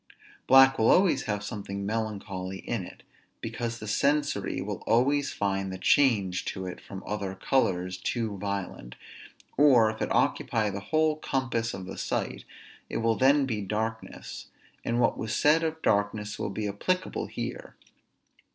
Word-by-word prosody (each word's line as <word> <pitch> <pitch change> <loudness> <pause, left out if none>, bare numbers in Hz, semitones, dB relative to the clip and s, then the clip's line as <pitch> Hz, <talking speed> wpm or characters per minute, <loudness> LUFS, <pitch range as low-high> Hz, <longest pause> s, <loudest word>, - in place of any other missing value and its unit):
Black 135 0 +7
will 110 - +4
always 175 -8 +4
have 105 -1 -2
something 100 -2 -5
melancholy 100 -3 -3
in 100 0 -3
it, - - -12 0.4
because 115 -1 -4
the 110 - -8
sensory 140 -3 +1
will 100 +1 -4
always 135 +5 +3
find 95 -1 -1
the 95 - -5
change 100 -6 +3
to 95 - -4
it 90 -1 -7
from 95 -1 -9
other 100 -2 -3
colors 90 -5 0
too 110 +2 -2
violent; 100 -11 -4 0.6
or 125 -7 +6
if 110 - -10
it - - -1
occupy 110 -2 +1
the 100 - -4
whole 155 -1 +2
compass 120 -6 -1
of 95 -1 -7
the - - -7
sight, - - -3 0.4
it - - -2
will 115 0 +2
then 135 +3 +4
be 110 -5 -2
darkness; 110 +3 -4 0.4
and 115 +1 0
what 120 - +2
was 110 0 -2
said 155 +2 +4
of 160 0 -3
darkness 105 +1 0
will - - -2
be 105 +1 -3
applicable 180 - -1
here. - - -6
110 Hz, 155 wpm, -28 LUFS, 100-135 Hz, 0.6 s, Black